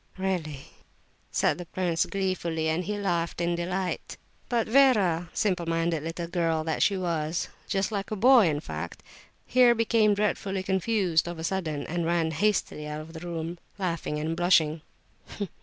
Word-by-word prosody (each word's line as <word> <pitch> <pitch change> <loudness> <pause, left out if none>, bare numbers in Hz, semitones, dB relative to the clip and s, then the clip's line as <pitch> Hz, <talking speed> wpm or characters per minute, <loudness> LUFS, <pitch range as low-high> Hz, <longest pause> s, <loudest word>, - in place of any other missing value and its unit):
"Really?" 175 -7 -2 0.7
asked - - +1
the 175 - -7
prince, 175 -2 0
gleefully, 180 -5 -1
and 160 +3 0
he 210 +1 -2
laughed 170 -5 -1
in 175 0 +1
delight. 180 +2 -3 0.3
But 235 -2 +1
Vera, 210 -10 +4
simple 180 -5 0
minded 165 -1 0
little 165 +2 -4
girl 165 -2 0
that 160 -1 -2
she 200 - +3
was 165 -2 -1 0.2
(just 195 +2 0
like 200 -2 -3
a 215 - -2
boy, 235 -1 +6
in 150 -2 0
fact), - - -6 0.4
here 245 -2 +5
became 220 -2 +3
dreadfully 200 -2 -1
confused, 190 -3 +1
of 175 -1 -5
a 160 - -6
sudden, 160 -4 -2
and 175 +1 -2
ran 165 -1 +1
hastily 160 -3 0
out 150 0 -4
of 160 +1 -11
the 160 - -7
room, 170 0 -5 0.2
laughing 170 -5 -2
and 160 +2 -2
blushing. 165 -3 +3
175 Hz, 160 wpm, -27 LUFS, 165-195 Hz, 0.7 s, boy